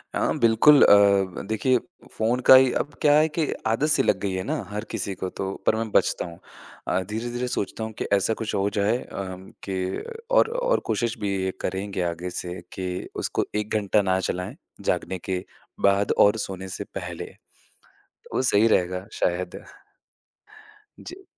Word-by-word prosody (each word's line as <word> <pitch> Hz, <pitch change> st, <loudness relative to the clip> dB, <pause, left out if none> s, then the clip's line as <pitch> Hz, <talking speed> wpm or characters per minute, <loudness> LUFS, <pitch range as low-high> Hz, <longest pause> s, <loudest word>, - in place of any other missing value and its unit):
हाँ, -, -, 0 dB
बिल्कुल 115 Hz, +6 st, +6 dB
अ, -, -, +8 dB
व 100 Hz, -2 st, +4 dB
देखिए 125 Hz, +4 st, +2 dB, 0.3 s
फ़ोन 115 Hz, +3 st, 0 dB
का 130 Hz, -, +10 dB
ही, 130 Hz, -1 st, +6 dB
अब 145 Hz, -, -2 dB
क्या 145 Hz, -, +5 dB
है 155 Hz, +1 st, +4 dB
कि 155 Hz, 0 st, -1 dB, 0.2 s
आदत 115 Hz, +7 st, +1 dB
से 135 Hz, -3 st, +3 dB
लग 95 Hz, -, +2 dB
गई 100 Hz, 0 st, -2 dB
है 95 Hz, 0 st, -2 dB
ना -, -, -2 dB
हर 105 Hz, +1 st, -4 dB
किसी 100 Hz, -, -3 dB
को 95 Hz, -, -4 dB
तो 95 Hz, +1 st, -4 dB
पर -, -, +4 dB
मैं 110 Hz, -1 st, -3 dB
बचता -, -, +2 dB
हूँ। 85 Hz, -1 st, -10 dB, 0.5 s
अ, 90 Hz, -, +1 dB
धीरे-धीरे 120 Hz, +3 st, -3 dB
सोचता 110 Hz, -1 st, -3 dB
हूँ 110 Hz, -, -4 dB
कि -, -, -3 dB
ऐसा 100 Hz, +3 st, +2 dB
कुछ 110 Hz, -1 st, -4 dB
हो 100 Hz, +1 st, +1 dB
जाए 105 Hz, +4 st, +2 dB
अम, 95 Hz, -1 st, -7 dB
कि 95 Hz, -1 st, -3 dB, 0.3 s
और, 480 Hz, -2 st, +5 dB
और -, -, +1 dB
कोशिश 120 Hz, -1 st, -1 dB
भी 100 Hz, -2 st, -1 dB
ये 95 Hz, -, 0 dB
करेंगे 95 Hz, 0 st, -3 dB
आगे 85 Hz, +2 st, -5 dB
से 90 Hz, 0 st, -5 dB
कि 90 Hz, -1 st, -4 dB, 0.2 s
उसको -, -, -1 dB
1 105 Hz, +1 st, -1 dB
घंटा 105 Hz, 0 st, +2 dB
ना 95 Hz, -1 st, +1 dB
चलाएँ, 90 Hz, 0 st, -3 dB, 0.3 s
जागने 95 Hz, -, -1 dB
के 90 Hz, -1 st, -1 dB, 0.4 s
बाद 100 Hz, +1 st, +3 dB
और 105 Hz, +2 st, +5 dB
सोने 95 Hz, -2 st, -5 dB
से -, -, -4 dB
पहले। -, -, -6 dB, 1.0 s
वो -, -, +1 dB
सही 115 Hz, -3 st, +4 dB
रहेगा 90 Hz, -2 st, +1 dB
शायद। 90 Hz, 0 st, -2 dB, 1.3 s
जी। 380 Hz, +2 st, -11 dB
100 Hz, 175 wpm, -25 LUFS, 95-115 Hz, 1.3 s, का